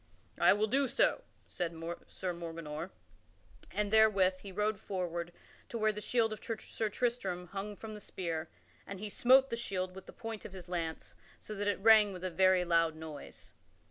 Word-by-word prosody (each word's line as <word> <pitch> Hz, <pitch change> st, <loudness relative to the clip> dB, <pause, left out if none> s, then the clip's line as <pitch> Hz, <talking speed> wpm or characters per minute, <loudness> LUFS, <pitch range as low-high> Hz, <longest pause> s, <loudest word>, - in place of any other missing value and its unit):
"I -, -, +7 dB
will 210 Hz, +1 st, +2 dB
do 270 Hz, +5 st, +2 dB
so," 275 Hz, -, +2 dB, 0.2 s
said 175 Hz, -2 st, -3 dB, 0.3 s
Sir 185 Hz, -2 st, -4 dB
Morganor; 165 Hz, -1 st, -6 dB, 0.8 s
and 210 Hz, +1 st, -1 dB
therewith 195 Hz, -4 st, +5 dB
he 195 Hz, -, -9 dB
rode 210 Hz, +1 st, 0 dB
forward 175 Hz, -3 st, -3 dB, 0.4 s
to 235 Hz, -, -4 dB
where 215 Hz, -1 st, +3 dB
the 210 Hz, 0 st, -6 dB
shield 225 Hz, 0 st, +2 dB
of 215 Hz, -, -9 dB
Sir 225 Hz, -1 st, -3 dB
Tristram 220 Hz, -6 st, -1 dB
hung 200 Hz, +1 st, -5 dB
from 220 Hz, +1 st, -8 dB
the 210 Hz, -, -8 dB
spear, 165 Hz, -4 st, -4 dB, 0.4 s
and 195 Hz, -1 st, -6 dB
he 210 Hz, +1 st, -4 dB
smote 260 Hz, +5 st, +5 dB
the -, -, +1 dB
shield 185 Hz, -5 st, -3 dB
with 190 Hz, 0 st, -11 dB
the -, -, -9 dB
point 225 Hz, -2 st, -6 dB
of -, -, -9 dB
his 185 Hz, -2 st, -9 dB
lance, 165 Hz, -2 st, -4 dB, 0.2 s
so 215 Hz, -, -8 dB
that 205 Hz, 0 st, -2 dB
it 205 Hz, -, +1 dB
rang 215 Hz, -2 st, +7 dB
with 180 Hz, 0 st, -8 dB
a 185 Hz, -, -2 dB
very 185 Hz, 0 st, +4 dB
loud 165 Hz, -2 st, +3 dB
noise. 155 Hz, -2 st, -9 dB
195 Hz, 185 wpm, -33 LUFS, 175-215 Hz, 0.8 s, I